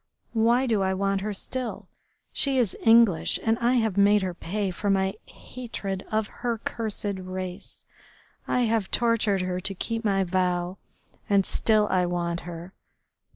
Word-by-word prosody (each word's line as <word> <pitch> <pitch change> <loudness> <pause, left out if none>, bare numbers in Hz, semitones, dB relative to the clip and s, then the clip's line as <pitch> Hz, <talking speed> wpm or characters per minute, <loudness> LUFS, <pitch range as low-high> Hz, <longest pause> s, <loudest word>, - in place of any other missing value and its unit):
Why 235 +3 +3
do 220 -5 +1
I 190 0 +1
want 195 0 0
her 210 +2 -2
still? 250 +4 -4 0.5
She 275 -2 +1
is 235 -7 +1
English 225 -6 +5
and 225 0 +2
I 240 +1 +2
have 220 -5 +1
made 200 0 +5
her 185 -1 -2
pay 195 +3 -3
for 205 +3 -3
my 190 0 +2
hatred 200 -6 -6
of 215 0 +1 0.2
her 240 -2 0
cursed 210 -3 -3
race. 185 0 -7 0.6
I 250 - +1
have 225 -4 +1
tortured 225 -5 +2
her 185 0 -2
to 195 +2 -3
keep 225 +4 -3
my 195 -2 +2
vow, 180 0 -1 0.5
and 200 -2 +4
still 215 -2 +2
I 180 -1 +2
want 170 -1 -2
her.... 170 +2 -8
200 Hz, 155 wpm, -26 LUFS, 185-225 Hz, 0.6 s, English